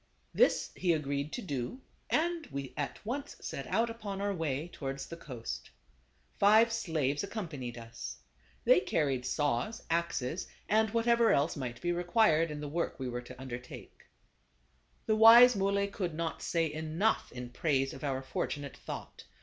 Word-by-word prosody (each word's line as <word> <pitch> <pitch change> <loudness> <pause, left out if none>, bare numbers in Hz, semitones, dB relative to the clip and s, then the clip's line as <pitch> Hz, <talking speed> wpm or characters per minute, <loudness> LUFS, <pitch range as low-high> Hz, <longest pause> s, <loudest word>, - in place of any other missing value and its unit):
This - - +3
he 175 -2 +2
agreed 145 -1 -2
to 245 - -4
do, 140 - -4 0.3
and 335 0 0
we 140 -2 -6
at 145 -2 -3
once 280 +5 -4
set - - -5
out 230 +1 +2
upon 215 -4 -5
our 200 0 0
way 160 -3 -2
towards 135 -5 -5
the 170 - -8
coast. 125 -8 -7 0.7
Five 220 +3 +6
slaves 155 -9 0
accompanied 155 - -5
us. 115 0 -7 0.5
They - - +7
carried 135 - 0
saws, 145 - -1
axes 170 -2 -1 0.2
and 220 +1 +3
whatever 230 +1 +3
else 145 +4 +2
might 125 -5 -5
be 175 - 0
required 175 -2 +3
in 150 -1 -5
the 150 - -4
work 170 +4 -2
we 130 -1 -3
were 120 0 -4
to 125 +1 -12
undertake. 125 -1 -9 1.0
The 220 - +2
wise 235 +2 +9
Muley 200 0 +1
could 185 -5 -3
not 165 0 -3
say 165 -3 0
enough 160 +7 0
in 125 0 -7
praise 135 0 0
of - - -10
our 135 -2 -1
fortunate 140 +1 -4
thought. - - -8
165 Hz, 160 wpm, -32 LUFS, 135-215 Hz, 1.0 s, wise